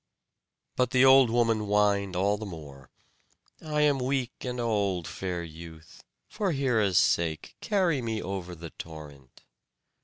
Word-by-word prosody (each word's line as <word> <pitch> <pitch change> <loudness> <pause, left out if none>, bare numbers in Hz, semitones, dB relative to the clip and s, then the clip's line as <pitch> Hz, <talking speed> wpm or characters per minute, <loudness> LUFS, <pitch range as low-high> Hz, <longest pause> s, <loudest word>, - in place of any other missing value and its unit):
But 125 -1 +1
the 130 +1 +4
old 135 -2 +7
woman 115 -1 +2
whined 100 -2 +1
all 100 +3 +2
the 105 - -7
more: 70 -7 -11 0.7
"I 150 -1 -1
am 145 -2 +3
weak 130 -1 -1
and 125 -1 -4
old, 100 -7 -1
fair 90 -1 -4
youth. 80 0 -12 0.2
For 205 -5 -2
Hera's 115 - +1
sake, 80 -2 +1
carry 180 -9 +1
me 110 -2 -3
over 90 -2 -5
the 85 0 -9
torrent." 75 -5 -12
105 Hz, 140 wpm, -28 LUFS, 85-125 Hz, 0.7 s, old